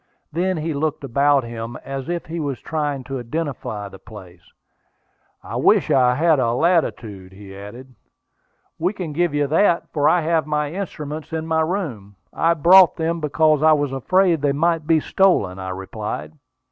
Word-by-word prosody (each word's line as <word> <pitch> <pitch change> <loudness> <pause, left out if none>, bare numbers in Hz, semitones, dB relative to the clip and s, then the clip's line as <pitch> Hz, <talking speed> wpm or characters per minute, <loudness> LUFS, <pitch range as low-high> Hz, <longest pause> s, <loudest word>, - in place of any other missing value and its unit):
Then 180 +3 -1
he 160 +1 -3
looked 150 +1 -2
about 140 +1 +2
him, 115 0 -6
as 135 0 -5
if 175 -1 -3
he 165 +1 -5
was 140 -4 -3
trying 145 -4 -3
to 135 0 -5
identify 120 -6 -4
the 95 -1 -13
place. 95 -5 -13 1.0
"I - - -5
wish - - +3
I 125 -1 +4
had 160 +1 +3
the 120 -3 +1
latitude," 115 - -1
he 95 0 -12
added. 120 +7 -11 0.9
"We 180 +5 0
can 175 -7 -6
give 170 -1 0
you 145 0 +1
that, 170 +4 +1
for 145 -2 +3
I 175 - +3
have 160 -1 0
my 150 -1 -1
instruments 155 -5 -6
in 160 0 -3
my 160 0 +1
room. 150 - -4 0.2
I 165 +1 +2
brought 175 +3 +6
them 165 +1 -2
because 155 0 +2
I 155 0 +6
was 145 -2 0
afraid 175 +4 +2
they 145 -1 +1
might 165 +1 0
be 165 -1 +4
stolen," 145 - +1
I 95 0 -5
replied. 95 +8 -6
150 Hz, 170 wpm, -21 LUFS, 120-165 Hz, 1.0 s, brought